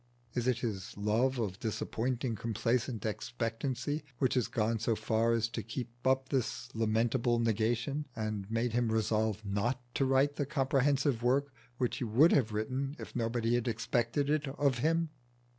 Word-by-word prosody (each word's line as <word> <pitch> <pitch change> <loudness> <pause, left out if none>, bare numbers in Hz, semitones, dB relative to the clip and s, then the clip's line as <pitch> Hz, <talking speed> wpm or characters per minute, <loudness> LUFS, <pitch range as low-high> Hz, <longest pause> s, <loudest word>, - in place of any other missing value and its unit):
Is 120 0 -1
it 125 -2 +3
his 100 -6 -4
love 115 +6 +1
of 100 -4 -2
disappointing 120 +2 -2
complacent 115 +1 -1
expectancy 120 +6 -2
which 130 0 +2
has 125 -4 +2
gone 115 0 0
so 110 +1 +1
far 110 +1 +1
as 115 -1 +2
to 115 - -4
keep 115 +3 -5 0.2
up 130 0 +2
this 130 -1 -2
lamentable 115 +2 +2
negation, 115 +6 0
and 110 -3 -3
made 115 +1 0
him 120 -1 +1
resolve 110 -1 0
not 105 +6 0
to 135 - +1
write 135 +2 +3
the 145 - -1
comprehensive 140 -2 +2
work 135 +3 +2 0.2
which 125 -1 0
he - - -2
would 125 +9 +5
have 120 -6 +3
written 130 +6 -2
if - - -9
nobody 115 0 0
had 120 0 +1
expected 120 +4 0
it 150 0 +1
of 135 -2 +1
him? 165 +4 +2
120 Hz, 160 wpm, -32 LUFS, 110-130 Hz, 0.2 s, would